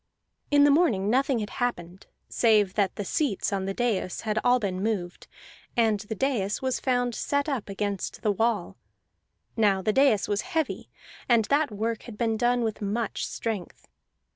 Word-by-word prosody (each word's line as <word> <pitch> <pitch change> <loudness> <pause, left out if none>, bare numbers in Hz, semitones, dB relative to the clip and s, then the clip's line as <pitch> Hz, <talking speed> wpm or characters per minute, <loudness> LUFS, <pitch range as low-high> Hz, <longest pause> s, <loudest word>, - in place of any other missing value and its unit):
In 290 -1 +5
the 290 - +6
morning 230 - +2
nothing 270 +1 +2
had 210 -2 -4
happened 185 -6 -3 0.2
save 210 -5 +3
that 200 -3 0
the 205 - -4
seats 220 -5 -1
on 190 -1 -1
the 195 - -2
dais 225 -7 -1
had 215 -1 -1
all 250 0 +4
been 190 -4 -2
moved, 195 -5 -3 0.5
and 220 -3 +3
the 215 +2 -6
dais 215 -5 0
was 260 -1 -1
found 245 -2 0
set 285 +5 -1
up 265 -9 -3
against 200 -1 -3
the 210 - +3
wall. 210 - -1 0.8
Now 200 -4 +2
the 215 - +1
dais 270 -6 +3
was 205 0 0
heavy, 320 -3 -3 0.4
and 230 -3 +4
that 285 +3 +2
work 220 +1 -3
had 210 - -10
been 225 -1 0
done 240 +1 +1
with 220 -1 -3
much 210 +2 -2
strength. 215 -6 -5
220 Hz, 170 wpm, -26 LUFS, 200-245 Hz, 0.8 s, the